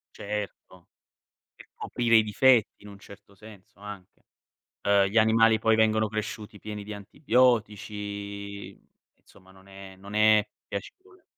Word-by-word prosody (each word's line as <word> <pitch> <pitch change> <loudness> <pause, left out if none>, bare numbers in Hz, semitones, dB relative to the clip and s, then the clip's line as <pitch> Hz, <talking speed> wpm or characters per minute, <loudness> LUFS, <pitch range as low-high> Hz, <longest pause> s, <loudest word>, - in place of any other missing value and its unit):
Certo, 100 -3 -7 0.7
per - - -17
coprire 115 -1 +1
i 110 - +6
difetti 115 +2 +2
in 105 - -12
un 100 -1 -12
certo 100 0 -16
senso, 100 -1 -16
anche. 105 -3 -11 0.6
Uhm, 100 -1 +3
gli 100 +4 +1
animali 110 0 +4
poi 110 +1 +2
vengono 110 0 +2
cresciuti 105 0 -6
pieni 105 0 -7
di 105 - -8
antibiotici, 105 -4 -2
mhmm, - - -31 0.3
insomma 95 0 -22
non 95 0 -20
è 95 -1 -12
non 100 +2 -12
è 105 0 +4 0.2
piacevole. 375 - -9
105 Hz, 135 wpm, -26 LUFS, 100-110 Hz, 0.7 s, i